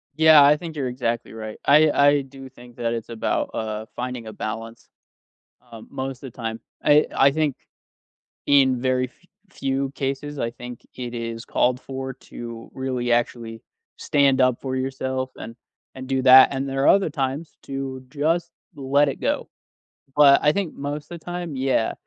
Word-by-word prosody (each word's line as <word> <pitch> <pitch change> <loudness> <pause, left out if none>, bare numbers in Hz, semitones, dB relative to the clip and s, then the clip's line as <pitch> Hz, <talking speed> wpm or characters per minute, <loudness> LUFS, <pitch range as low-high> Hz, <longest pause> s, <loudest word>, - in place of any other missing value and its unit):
Yeah, 155 -1 +7
I 145 +1 +6
think 165 -1 -8
you're 135 -4 -2
exactly 120 -2 -3
right 110 -1 -7
I 150 +2 +6
I 145 0 +4
do 135 0 -11
think 120 -2 -16
that 115 -1 -1
it's 115 0 -5
about, 115 -1 -1
uh, 110 0 -4
finding 125 -2 -5
a 110 - -7
balance, 115 +1 -6 0.8
uh, 115 - -10
most 135 0 -5
of 130 - -7
the - - -34
time. 115 -1 -4 0.3
Eh, 150 +1 +6
I 135 +1 +5
think 150 -2 0 0.9
in 130 -3 +4
very 130 0 +1
f 180 - -29 0.2
few 135 -4 -2
cases, 140 +1 -4
I 115 - -1
think 125 0 -10
it 125 -1 -6
is 115 -1 -5
called 125 0 +1
for 130 0 -6
to 115 -2 -10
really, 125 -2 -2
actually 115 -1 -1 0.3
stand 140 -2 +2
up 130 -2 +3
for 130 -1 -3
yourself 130 0 -3
and 115 - -9 0.4
and 130 0 -8
do 130 0 0
that 130 0 +9
and 135 0 -2
there 135 +1 -1
are - - +5
other 195 -4 +5
times 140 +2 -4
to 135 -1 -6
just 165 +3 0 0.2
let 140 +1 +2
it 135 - -5
go, - - -1 0.7
but 145 -2 +7
I 150 - +5
think 185 -1 -3
most 145 +2 -5
the 175 - -7
time, 175 -1 -6
yeah, 130 -4 +1
130 Hz, 175 wpm, -23 LUFS, 120-145 Hz, 0.9 s, that